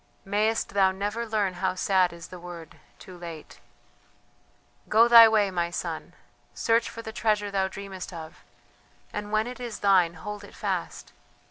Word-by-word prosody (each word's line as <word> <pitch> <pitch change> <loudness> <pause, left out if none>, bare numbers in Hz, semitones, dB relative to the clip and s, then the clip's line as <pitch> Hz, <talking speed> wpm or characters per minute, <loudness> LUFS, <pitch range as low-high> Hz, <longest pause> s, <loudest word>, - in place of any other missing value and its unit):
Mayest 210 +3 0
thou 195 -1 +3
never 205 +5 -3
learn 210 -4 0
how - - 0
sad 185 -1 +2
is 170 0 -11
the 180 - -10
word: 170 -2 -10 0.2
Too 185 - -12
late! 170 -3 -10 1.3
Go 225 +2 +6
thy 230 -1 +10
way, 210 -3 +2
my 175 -2 -1
son. 170 -2 -5 0.4
Search 230 - +1
for 230 0 -9
the 220 - -7
treasure 210 -3 0
thou 190 -1 +1
dreamest 195 -1 -8
of, 160 -2 -10 0.7
and 210 0 -5
when 215 0 +2
it 250 +1 -7
is 240 -3 -6
thine 185 -4 +4
hold 205 +5 -7
it 200 - -13
fast. - - -4
200 Hz, 160 wpm, -26 LUFS, 180-220 Hz, 1.3 s, thy